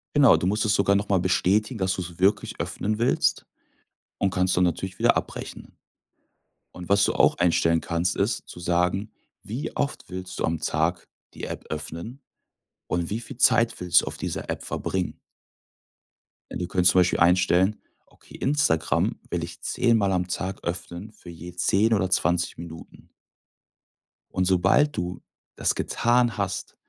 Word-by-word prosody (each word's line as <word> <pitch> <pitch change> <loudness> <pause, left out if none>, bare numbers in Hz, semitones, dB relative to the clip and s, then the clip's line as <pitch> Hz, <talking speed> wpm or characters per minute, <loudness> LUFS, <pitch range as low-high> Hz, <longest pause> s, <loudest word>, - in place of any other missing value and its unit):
Genau, 140 -4 +7
du 90 - -1
musst 105 +2 +1
es 105 -1 +2
sogar 100 -1 +3
noch 100 +1 -1
mal 95 - +3
bestätigen, 100 +6 +1
dass 95 -2 0
du's 90 -2 -7
wirklich 95 +3 +1
öffnen 105 +2 -2
willst, 120 - +1 0.7
und 100 - +1
kannst 90 0 +1
dann 90 - +3
natürlich 90 +1 -2
wieder - - +3
abbrechen. - - -7 1.0
Und 90 0 -10
was 100 0 +4
du - - 0
auch - - +3
einstellen 85 -1 +3
kannst, 85 +1 -1
ist, - - -1
zu - - -10
sagen: 90 +4 0 0.3
„Wie 130 +9 -5
oft 140 - -3
willst 95 0 -7
du - - +1
am 80 -1 -1
Tag 80 +3 -1 0.3
die - - -7
App - - -7
öffnen 85 - -6 0.7
und 85 0 -1
wie 105 - -2
viel 125 +2 -9
Zeit 115 -2 +3
willst 90 -1 +4
du - - -7
auf - - -4
dieser - - -5
App - - -3
verbringen?“ 95 -2 -3 1.3
Denn - - -5
du 90 - -3
könntest 90 0 +3
zum 95 - +4
Beispiel 90 - +2
einstellen: 90 +3 +3 0.3
„Okay, - - -18
Instagram 135 - +1
will 85 -1 -2
ich 85 0 -8
10 115 -2 +2
am 95 -3 +1
Tag 95 +1 -4
öffnen, 85 +4 -5
für 90 - -14
je 85 +1 -9
10 100 +5 +2
oder 95 -3 +1
20 85 -2 +1
Minuten.“ 80 -1 -11 1.3
Und 90 - +2
sobald 95 +11 +3
du 90 +1 -4 0.3
das - - 0
getan 120 -2 +1
hast, 100 -2 -3
90 Hz, 165 wpm, -25 LUFS, 85-105 Hz, 1.3 s, Genau